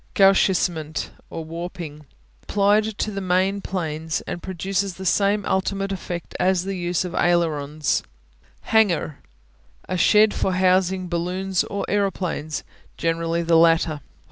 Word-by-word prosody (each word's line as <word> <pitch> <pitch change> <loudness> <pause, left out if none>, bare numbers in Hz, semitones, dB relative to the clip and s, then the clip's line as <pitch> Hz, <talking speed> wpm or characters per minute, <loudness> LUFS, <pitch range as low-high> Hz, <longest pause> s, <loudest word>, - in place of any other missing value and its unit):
Gauchissement 180 -5 +2 0.2
(or 165 -1 -6
warping) 165 -3 -7 0.3
Applied 205 +1 +2
to 215 - -1
the 195 -1 -4
main 190 +2 +1
planes 160 -5 -3
and 175 - -6
produces 190 +1 -2
the 190 - -8
same 200 +2 +2
ultimate 195 +1 -1
effect 175 -2 -5
as 185 -1 +2
the 195 0 -3
use 175 0 -1
of 180 - -6
ailerons. 155 -4 +1 0.6
Hangar 220 -5 +4
(hang'ar) 150 -1 -6 0.7
A 185 - -2
shed 210 +3 +5
for 190 - 0
housing 185 0 +2
balloons 180 +2 -1
or 200 - -3
aeroplanes, 185 -6 -1 0.3
generally 165 0 0
the 165 0 +4
latter. 165 -2 +3
180 Hz, 130 wpm, -23 LUFS, 165-195 Hz, 0.7 s, shed